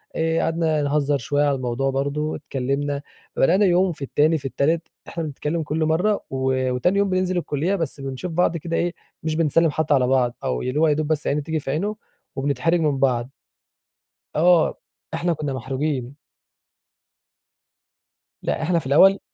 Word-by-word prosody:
آآ 165 0 +1
قعدنا 160 -2 +1
نهزر 145 0 +1
شويّة 145 +4 0
على 140 -1 +2
الموضوع 130 +1 -1
برضه، 145 +3 -1
اتكلمنا، 140 +2 -2 0.3
بدأنا 190 +9 +4
يوم 185 0 +3
في 150 - -11
التاني 155 +4 +2
في 140 - -10
التالت 155 +5 0 0.2
إحنا 170 - -4
بنتكلم 155 +2 -3
كل 155 +2 -1
مرّة، 180 +7 +1
و 130 -1 0
وتاني 125 +10 +1
يوم 200 -1 +2
بننزل 185 0 0
الكلية 170 +3 0
بس 165 -5 -3
بنشوف 135 +6 -5
بعض 170 0 +1
كده 165 +1 -3
إيه، 175 0 0 0.3
مش 155 0 -1
بنسلّم 165 +1 +3
حتّى 155 0 +1
على 130 -3 +3
بعض، 125 -2 +2
أو 60 -1 -1
اللي 130 +4 -1
هو 160 - +4
يا 150 - +4
دوب 155 0 -1
بس 155 -1 -1
عيني 150 +1 +1
تيجي 160 +2 -2
في 135 - -4
عينه 200 +9 -1 0.4
وبنتحرج 145 +5 +1
من 150 -4 +1
بعض. 125 -3 +1 1.1
آه، 170 +1 +4 0.4
إحنا 170 +1 0
كنا 150 -3 -3
محروجين. 130 0 -3 2.3
لأ، - - -1
إحنا 170 +1 +2
في 145 - -7
الأول 190 +8 +6
150 Hz, 170 wpm, -23 LUFS, 135-165 Hz, 2.3 s, الأول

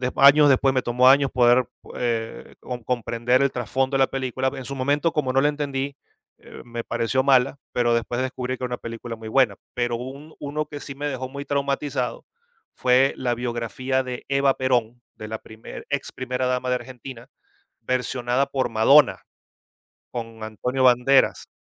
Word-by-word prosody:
años 140 +2 +7
después, 135 0 +3
me 130 - +2
tomó 125 +1 +4
años 140 0 +5
poder, 120 0 +4 0.3
eh, 115 -2 -3
con 125 -2 -6
comprender 120 0 +1
el 140 -1 +2
trasfondo 130 +3 -1
de - - +2
la 135 - +5
película. 130 0 -2
En 135 - -6
su 140 +2 -6
momento, 145 +5 +1
como 135 -5 -1
no 135 - +4
le 145 - +3
entendí, 140 -1 -3 0.4
eh, - - -13
me 120 -1 -6
pareció 130 +3 0
mala, 135 0 +3
pero 120 -1 +2
después 115 +1 -1
descubrí 130 -1 -3
que 125 - -8
era 125 - -2
una 120 - -2
película 115 0 -7
muy 110 0 -9
buena. 120 -3 +3 0.2
Pero 120 -1 -1
un 135 +5 -9
uno 150 +1 -3
que 145 - -8
sí 140 -1 -8
me 145 +1 -3
dejó 130 -2 -4
muy 140 +2 -7
traumatizado 140 -2 -2 0.5
fue 130 +2 +3
la 120 -2 -1
biografía 120 +2 -2
de 125 -1 -6
Eva 140 -1 +3
Perón, 120 -2 0
de 110 - -8
la 110 - -4
primer 110 +1 -11
ex 140 -1 -3
primera 130 0 -3
dama 125 0 -1
de 125 - +2
Argentina, 125 0 -9 0.5
versionada 125 +2 0
por 135 -1 -1
Madonna, 125 +5 +5 0.9
con 115 -2 -6
Antonio 125 +4 -2
Banderas. 130 +2 +4
130 Hz, 175 wpm, -23 LUFS, 120-135 Hz, 0.9 s, años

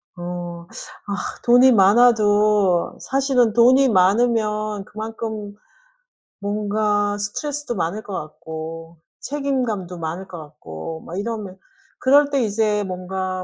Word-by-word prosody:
어. 175 -1 -6 0.4
아 200 - -2 0.3
돈이 245 +2 +6
많아도 210 -3 +4
사실은 265 -4 +2
돈이 255 +3 +5
많으면 215 +1 +1
그만큼 215 -1 -6 0.8
뭔가 205 0 0
스트레스도 275 +5 -2
많을 190 +5 -2
것 205 - -8
같고 160 0 -7 0.2
책임감도 250 -11 -2
많을 165 +4 -5
것 175 - -9
같고 150 - -9
막 175 - -7
이러면 205 -3 -5 0.4
그럴 285 +2 +4
때 275 -2 +1
이제 210 -1 +1
뭔가 185 0 -4
205 Hz, 225 characters per minute, -21 LUFS, 180-230 Hz, 0.8 s, 돈이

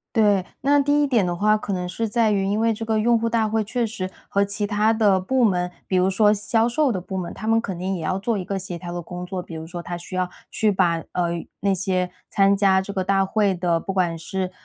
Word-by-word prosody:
对， 205 -4 +4 0.2
那 285 +2 +3
第 290 +1 +3
一 - - +3
点 240 -7 +2
的 175 - -1
话， 215 +4 +3
可 210 -1 -4
能 180 -1 -2
是 225 +6 -2
在 225 0 +2
于 195 -1 +1
因 205 +2 0
为 225 0 +2
这 225 - -5
个 220 -1 0
用 235 +1 +3
户 230 +1 -1
大 225 -1 +1
会 220 0 0
确 235 +3 -1
实 195 -4 -5 0.2
和 200 0 +2
其 205 +1 -2
他 210 +1 +2
的 210 -4 +3
部 255 +8 0
门， 180 -5 +2 0.2
比 190 - 0
如 185 +1 +3
说 210 +2 +4
销 220 +3 +1
售 270 +2 +1
的 185 - -2
部 190 +2 -6
门， 180 -2 -4
他 215 - -7
们 225 0 +4
肯 195 -6 -4
定 190 +2 -2
也 175 - -4
要 185 - -1
做 220 +3 -1
一 190 - -3
个 195 +1 -3
协 185 -2 -5
调 175 0 -7
的 175 - -3
工 180 +1 -7
作， 180 0 -4
比 170 - -10
如 160 0 -6
说 175 +1 -7
他 175 0 -5
需 175 +2 -9
要 185 -1 0 0.2
去 215 - +1
把， 175 -4 +1
呃， 170 -1 -2
那 200 0 +2
些 185 -1 0 0.2
参 195 0 +3
加 195 -1 +3
这 200 - -6
个 190 -2 -1
大 195 +1 +2
会 200 0 +1
的， 170 -2 0
不 195 - -4
管 175 -3 0
是， 185 +3 -3
195 Hz, 290 characters per minute, -23 LUFS, 180-220 Hz, 0.2 s, 对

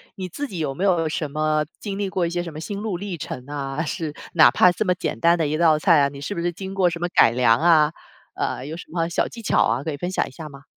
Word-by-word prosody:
你 185 -1 -5
自 280 - -5
己 195 -10 -7
有 145 -4 -2
没 180 - -3
有 175 -5 +2
什 155 -2 -3
么 155 0 +1 0.2
经 200 -2 -5
历 200 -1 -2
过 185 -2 0
一 - - -3
些 175 0 -2
什 170 - -7
么 155 - -8
心 200 +5 -5
路 205 -4 -3
历 195 0 -5
程 125 -4 -7
啊， 140 0 -4
是 155 0 -4 0.2
哪 160 -2 +7
怕 180 -1 +5
这 - - -1
么 185 -3 +2
简 180 - -4
单 170 +1 +4
的 160 - +1
一 155 +1 -1
道 160 -2 +4
菜 160 -2 +5
啊， 140 - +3
你 140 0 -10
是 175 +9 -5
不 170 - -3
是 175 +1 0
经 190 +2 -7
过 190 -2 +3
什 170 0 -6
么 175 - -1
改 115 - +6
良 120 -2 +3
啊， 160 -2 +4 0.4
呃， 130 - -3
有 155 +3 -6
什 170 - -8
么 165 0 -1
小 170 - 0
技 235 - -10
巧 220 - +2
啊， 120 +4 0
可 160 - -2
以 - - -4
分 175 +6 -4
享 - - 0
一 - - -12
下 155 +1 -9
吗？ 140 0 -13
165 Hz, 325 characters per minute, -23 LUFS, 150-180 Hz, 0.4 s, 哪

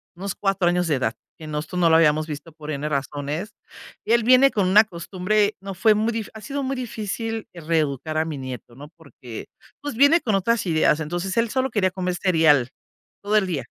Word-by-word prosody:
unos 190 +2 -5
4 195 -3 0
años 180 0 +1
de 155 - +2
edad, 120 -4 -1 0.2
que 155 - -10
nosotros 155 +4 -4
no 170 -2 +4
lo 160 - +5
habíamos 155 -1 +3
visto 155 +2 -7
por 155 0 -8
N 150 0 -3
razones. 145 +7 -3 0.5
Él 235 +1 +3
viene 255 +3 +6
con 200 -3 +1
una 205 +4 +7
costumbre, 200 +2 -1
no 195 0 -6
fue 220 +4 +4
muy 215 +2 0
difícil 225 -2 -5
ha 220 - -10
sido 280 +3 -4
muy 270 +1 -2
difícil 225 -2 -4
reeducar 155 -3 -1
a 160 - +1
mi 155 -3 -5
nieto, 130 -3 -8
¿no? 145 +3 -11
Porque, 130 -7 -10 0.3
pues, 290 -3 -5
viene 285 +7 +5
con 220 - -1
otras 225 +4 +1
ideas. 160 -2 +2
Entonces, 175 +4 -3
él 230 0 +2
solo 260 +2 0
quería 200 -5 +1
comer 180 -1 -2
cereal, 160 -8 +3 0.5
todo 205 +1 +1
el 210 -2 +3
día. 155 -8 -3
180 Hz, 205 wpm, -23 LUFS, 155-215 Hz, 0.5 s, una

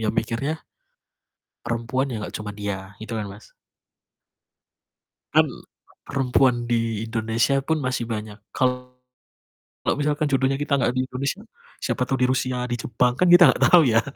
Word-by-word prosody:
ya 110 - -1
mikirnya 115 +8 -2 1.1
perempuan 120 +4 -1
ya 120 - -3
nggak 105 - -7
cuman 105 -1 -6
dia, 100 -2 -3 0.2
gitu 110 +1 -6
kan, 105 -2 -3
Mas. 100 +2 -14 1.8
Kan - - +6 0.6
perempuan 130 -1 +2 0.2
di 115 -2 0
Indonesia 115 +4 +1
pun 160 -1 +1
masih 130 -2 -1
banyak. 105 -2 -5 0.2
Kalau, 125 0 -1 1.1
misalkan 150 +1 0
jodohnya 135 0 +2
kita 145 -1 +1
nggak 125 - +1
di - - 0
Indonesia, 140 +10 -3 0.4
siapa 130 - -1
tahu 135 - 0
di 125 - +4
Rusia, 130 -1 -1
di - - +1
Jepang 125 +1 +1
kan 180 - +4
kita 175 0 +9
nggak - - 0
tahu 175 - +9
ya. 115 - +5
125 Hz, 150 wpm, -23 LUFS, 115-135 Hz, 1.8 s, kita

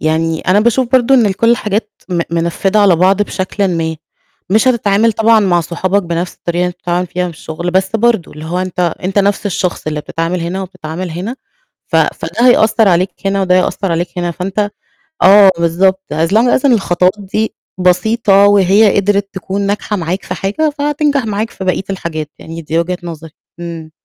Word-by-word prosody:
يعني 160 +1 0
أنا 190 +3 +2
باشوف 240 +3 +1
برضه 260 +1 +4
إن 220 -6 +3
كلّ 230 +4 +1
الحاجات 215 -2 -1 0.2
م 175 -2 -1
منفّدة 170 +5 0
على 195 -4 +4
بعض 190 +4 +3
بشكلٍ 195 0 -2
ما، 160 -1 -2 0.5
مش 220 +5 +3
هتتعامل 220 -2 +2
طبعًا 225 +1 +3
مع 180 -4 +2
صحابك 185 +4 -1
بنَفْس 170 0 -3
الطريقة 170 0 -4
اللي 180 - +1
أنت 175 - -9
بتتعامل 180 0 -2
فيها 180 +1 -3
في 170 -3 -6
الشُغل، 170 +2 -5
بس 190 +1 +1
برضه 225 -5 +1
اللي 155 +1 -10
هو 170 +3 -3
أنت 185 -1 -3 0.2
أنت 195 +2 0
نَفْس 200 +1 +1
الشخص 180 -4 -3
اللي 155 -1 -2
بتتعامل 165 +4 -3
هنا 180 +3 -3
وبتتعامل 180 -1 -6
هنا، 185 +10 -5 0.5
ف - - -1
فده 240 - 0
هيأثّر 220 -2 +4
عليك 185 +1 +2 0.2
هنا 195 0 +1
وده 180 -1 +2
هيأثّر 185 0 0
عليك 175 +2 -1
هنا، 175 -1 -1
فأنت 195 +4 -2 0.5
آه 200 +1 +7
بالضبط، 185 +3 +1
as 160 +2 +1
long 245 +3 +3
as - - -4
إن 265 - +5
الخطوات 180 -3 +2
دي 210 +2 -2 0.3
بسيطة 195 +2 +3
وهي 205 +1 +4
قدرت 200 0 +1
تكون 190 +1 -4
ناجحة 205 +1 -2
معاك 180 +1 -3
في - - -4
حاجة 205 +12 -1
فهتنجح 290 -2 0
معاك 215 +1 -2
في - - -8
بقية 185 +1 0
الحاجات، 160 -5 -4
يعني 165 +1 -8
دي 160 +1 -1
وجهة 180 +2 -2
نظري، 165 -2 -8 0.3
إمم. 165 -2 -7
190 Hz, 185 wpm, -14 LUFS, 170-210 Hz, 0.5 s, آه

